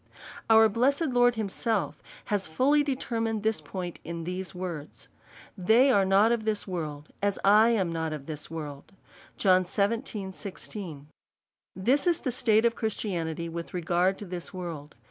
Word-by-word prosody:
Our 220 0 +7
blessed 275 +8 +1
Lord 245 -1 +4
himself 220 0 -2 0.2
has 205 -2 -1
fully 270 - +3
determined 230 -6 -2
this 220 0 +1
point 180 -3 -6
in 170 0 -5
these 180 +2 -4
words: 170 -5 -6 0.5
They 225 +8 +4
are 200 -5 +4
not 195 +4 +4
of 235 -2 0
this 215 -1 -1
world, 155 -5 -5
as 200 -1 +1
I 210 +3 +6
am 195 -7 +1
not 160 -1 -2
of 150 -3 -6
this 150 -1 -6
world. 150 +1 -7 0.4
This 185 -2 +2 2.3
is 345 -2 +3
the 255 - -1
state 225 -2 +3
of 235 - +3
Christianity 170 -7 -3
with 170 +2 -6
regard 180 +2 +1
to 205 - -8
this 180 -2 -5
world. 165 -5 -7
195 Hz, 145 wpm, -28 LUFS, 170-225 Hz, 2.3 s, Our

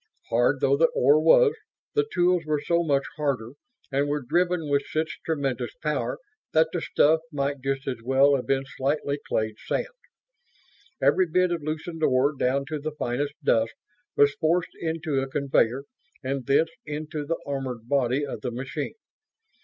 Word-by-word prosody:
Hard 120 +4 +2
though 135 - +4
the 165 +2 +5
ore 145 +4 +5
was, 435 - +6 0.4
the 435 0 +2
tools 180 -1 +2
were 155 -1 0
so 170 +3 +1
much 140 -4 +2
harder 135 -6 -1 0.4
and 140 +1 +1
were 145 -1 -1
driven 175 +4 +1
with 140 -1 +2
such 155 0 -2
tremendous 140 - -2
power - - -2 0.4
that 160 0 +4
the 175 - -1
stuff 160 +1 +3
might 140 -1 -2
just 135 0 -2
have 125 -4 -4
well 135 +3 +4
have 130 - -3
been 135 0 +1
slightly 140 +2 -2
clayed 110 -1 -1
sand. - - -1 1.2
Every 185 - +4
bit 180 +2 +2
of 170 -2 -1
loosened 160 +2 -5
ore, 140 0 +3
down 135 +1 0
to 155 -1 -3
the 155 +1 -4
finest 140 +4 -2
dust, 115 -4 +2 0.4
was 145 -1 +5
forced 165 +3 0
into 160 -3 -1
a 135 - -3
conveyor 135 -2 +1 0.4
and 135 0 -3
thence 160 +4 +3
into 150 0 -5
the 165 +3 -2
armored 130 -5 -4
body 135 +1 +1
of - - -6
the 125 - -2
machine. 135 - -5
145 Hz, 165 wpm, -26 LUFS, 135-160 Hz, 1.2 s, was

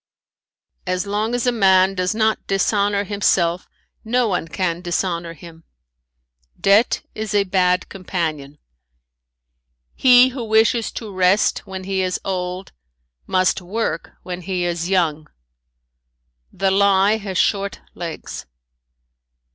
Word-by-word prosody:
"As 185 +2 -1
long 210 +4 -1
as 245 - -1
a 245 - +3
man 190 -4 +4
does 185 +2 -1
not 220 0 0
dishonor 200 +1 +1
himself 185 -4 0 0.4
no 240 +2 +1
one 180 -4 -2
can 170 +1 -2
dishonor 175 -1 -2
him. 165 0 -14 1.0
"Debt 205 +5 +3
is 215 -1 -4
a 200 - +4
bad 180 -1 +1
companion. 160 -7 -4 1.4
"He 250 0 +6
who 255 -1 -6
wishes 220 +1 +2
to 215 -4 -7
rest 190 +3 +2
when 190 -1 -6
he 190 0 -1
is 185 -1 -1
old 185 0 -4 0.6
must 185 0 +1
work 210 +6 -3
when 180 0 -6
he 180 0 -2
is 175 0 -2
young. 160 -5 0 1.2
"The 195 +1 0
lie 200 +1 +3
has 195 -4 -5
short 200 0 0
legs. 170 -2 -7
190 Hz, 120 wpm, -20 LUFS, 180-210 Hz, 1.4 s, He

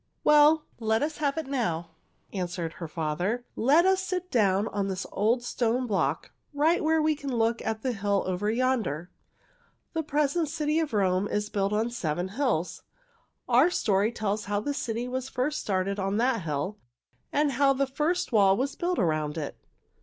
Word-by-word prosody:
"Well, 300 +1 +6
let 220 +2 +1
us 305 +1 -2
have 290 0 0
it 320 - -2
now," 195 -12 -2 0.4
answered 175 -3 -3
her 165 - -3
father. 175 +10 -2
"Let 295 +9 +4
us 380 0 +3
sit 365 -1 -3
down 200 -3 +2
on 200 -1 -2
this 190 -1 -3
old 230 +4 +1
stone 245 +1 0
block 205 -5 -1 0.2
right 315 +4 +3
where 320 +1 +3
we 310 0 +3
can 280 -2 -5
look 230 +1 +1
at 220 0 -3
the 260 - 0
hill 200 -2 0
over 185 +3 -1
yonder. 225 - 0 0.8
The 325 - 0
present 300 +1 0
city 305 0 0
of 315 -2 -1
Rome 190 -1 +2
is 210 0 -2
built 200 -1 0
on 220 +3 0
seven 175 -5 -2
hills. 215 - -1 0.7
Our - - +5
story 210 - +1
tells 215 -2 -2
how 205 0 0
the 285 +7 -2
city 240 -3 -3
was 260 +1 -4
first 265 +4 -1
started 195 0 -1
on 195 +1 -1
that 240 -1 +1
hill 165 +6 -3 0.5
and 295 0 +2
how 275 +2 +3
the 275 +1 +1
first 300 +7 -1
wall 195 -3 +5
was 270 +3 -1
built 355 +1 -1
around 155 -4 0
it." 150 -3 -4
225 Hz, 175 wpm, -27 LUFS, 195-285 Hz, 0.8 s, Well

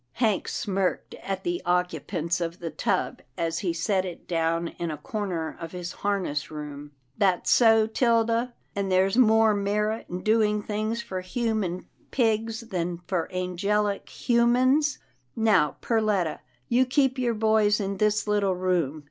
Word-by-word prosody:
Hank 220 -5 +1
smirked 195 -3 -2
at 195 -1 -4
the 350 0 -2
occupants 175 -1 -1
of 170 0 -3
the 170 -2 -5
tub 155 - -1 0.2
as 165 0 -1
he 180 - -1
set 185 +3 0
it 180 -2 -8
down 165 0 0
in 170 - -2
a 155 - -4
corner 175 -2 -4
of 165 +1 -7
his 175 -1 -5
harness 190 -8 -2
room. 150 -1 -8
" 125 +2 -41
That's 190 -3 +2
so, 225 -2 +6
'Tilda, 230 +1 +1 0.2
and 200 -1 -1
there's 190 +2 +3
more 220 -3 +5
merit 210 +2 -1
in 180 +1 -5
do 220 +1 +3
ing 210 -1 +1
things 215 +3 -2
for 185 -1 -4
human 195 -2 -2 0.2
pigs 225 -2 0
than 180 -6 -3
for 175 -3 -2
angelic 200 +3 -1 0.2
hu 235 -1 +4
mans 260 +5 +3 0.2
— - - -44
Now 205 - +3
Perletta, 210 -8 +1 0.3
you 250 +2 +3
keep 265 0 +2
your 240 -2 +1
boys 215 -1 +3
in 195 -1 -2
this 210 0 +1
little 205 -3 +1
room. 175 -5 0
200 Hz, 160 wpm, -26 LUFS, 175-225 Hz, 0.3 s, so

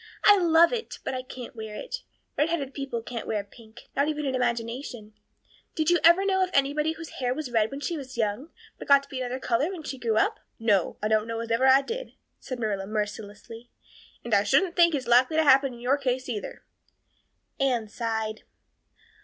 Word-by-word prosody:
I 410 -1 +8
love 335 +2 +5
it, 465 -1 -4
but - - -3
I 255 - -3
can't 255 -1 -10
wear 220 -1 -7
it. - - -6 0.3
Redheaded 295 -3 -1
people 270 -5 -4
can't 235 -2 -6
wear 210 -2 -1
pink, 220 +2 -16
not 280 +2 +2
even 300 -1 -2
in 265 - -1
imagination. 235 -2 -3 0.6
Did 315 +1 +1
you 350 - +4
ever 345 +4 +6
know 380 -1 +2
of 370 - -1
anybody 290 +3 +2
whose 325 -1 -10
hair 250 -1 0
was 295 -4 -5
red 220 -2 +2
when 275 +1 -7
she 335 +2 -2
was 260 -3 -9
young, 225 +7 -1 0.3
but - - -9
got 280 0 +6
to - - -17
be 265 - -5
another 255 0 -3
color 255 +5 0
when 365 -5 -7
she 270 -3 -6
grew 225 -3 0
up?" - - +1 0.2
"No, 205 -6 +1
I - - +2
don't 215 0 +1
know 230 0 -3
as 230 0 -6
I - - +3
ever 265 +3 +5
did," - - -5 0.3
said 255 - -6
Marilla 205 -4 -2
mercilessly, 215 +2 -5 0.6
"and 235 - -3
I 200 - +6
shouldn't 335 - +2
think 340 -2 +5
it 265 -3 -3
likely 255 +6 +4
to 320 - +4
happen 270 -2 +4
in - - -13
your 260 +4 +1
case 255 -1 -1
either." 220 -5 -5 1.0
Anne 250 -5 +1
sighed. 220 0 -3
255 Hz, 205 wpm, -26 LUFS, 225-300 Hz, 1.0 s, I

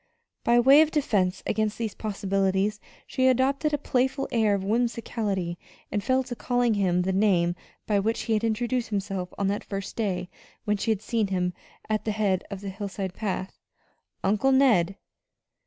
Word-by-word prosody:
By 240 +1 +4
way 270 +5 +7
of 315 - +4
defense 200 - 0
against 215 -1 0
these 225 -3 -3
possibilities 195 0 0 0.3
she 260 -1 +1
adopted 270 +4 +2
a 295 - +1
playful 265 0 0
air 220 -4 +3
of 195 - -3
whimsicality 210 -5 -1 0.3
and 205 -1 -1
fell 260 0 +2
to 245 - -6
calling 245 -1 +1
him 180 -3 +1
the 190 +1 0
name 185 -4 +2 0.3
by 205 -2 +2
which 220 +3 0
he 225 - -1
had 215 +1 +1
introduced 235 +2 0
himself 195 -3 -3
on 200 - 0
that 205 - -2
first 195 -1 -5
day 185 -5 -1 0.4
when 210 -1 +1
she 210 - -2
had 215 -2 0
seen 220 -2 0
him 180 -2 -1 0.3
at 215 -1 -1
the 215 - 0
head 200 -3 +1
of 200 -2 -6
the 200 - -5
hillside 195 -1 -5
path 190 -2 -4 0.6
"Uncle 215 +7 +2
Ned." 225 -9 +4
210 Hz, 170 wpm, -26 LUFS, 195-240 Hz, 0.6 s, way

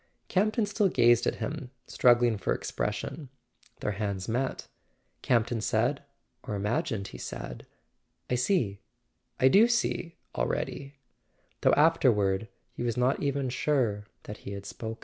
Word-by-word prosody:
Campton 215 +3 +2
still 205 0 +1
gazed 120 -5 +4
at - - +1
him, 145 -4 -5 0.2
struggling 120 -2 +4
for 100 - -1
expres¬ - - -2
sion. 145 -5 -6 0.5
Their 105 - -1
hands 100 -2 -3
met. 125 +4 -2 0.5
Campton 115 -1 +1
said—or 105 - -3
imagined 110 - -1
he - - -10
said: 60 - -7 0.6
"I - - -2
see—I 125 - -1
do 205 - +6
see, 235 -7 -1 0.2
already 140 - -3 0.3
" - - -41
though - - +4
afterward 110 -10 +3 0.3
he - - -7
was 120 -1 -1
not 125 +2 +2
even 140 -2 0
sure 120 -7 0 0.2
that 105 - -8
he 100 - -8
had 100 0 -7
spoken. 110 0 -6
120 Hz, 135 wpm, -29 LUFS, 105-145 Hz, 0.6 s, do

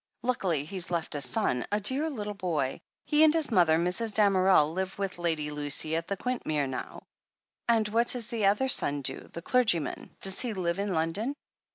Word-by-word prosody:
Luckily 185 - -1
he's 185 +2 -3
left 170 -2 -3
a 145 - -1
son 125 -1 0
— - - -35
3. 210 - 0
dear 270 +9 +2
little 210 -7 -5
boy. 170 -9 -2 0.3
He 300 +1 +3
and 310 - +6
his 315 -4 +1
mother, 170 -6 +4
Mrs. 185 +6 0
Damerel, 190 -6 +4
live 190 +1 -4
with 195 -3 -4
Lady 160 -3 -1
Lucy 150 +2 0
at 165 0 -3
Quintmere 195 - -2
now." 130 -1 -7 0.7
"And 225 -2 +3
what 230 +3 +1
does 245 -3 +4
the 225 -4 0
other 210 +7 +2
son 145 - +2
do - - -4
— - - -27
^the 170 - -8
clergyman? 220 - 0
Does 195 0 +3
he 240 -4 -1
live 175 0 -2
in 200 -1 -2
London 180 - -2
190 Hz, 195 wpm, -28 LUFS, 160-225 Hz, 0.7 s, and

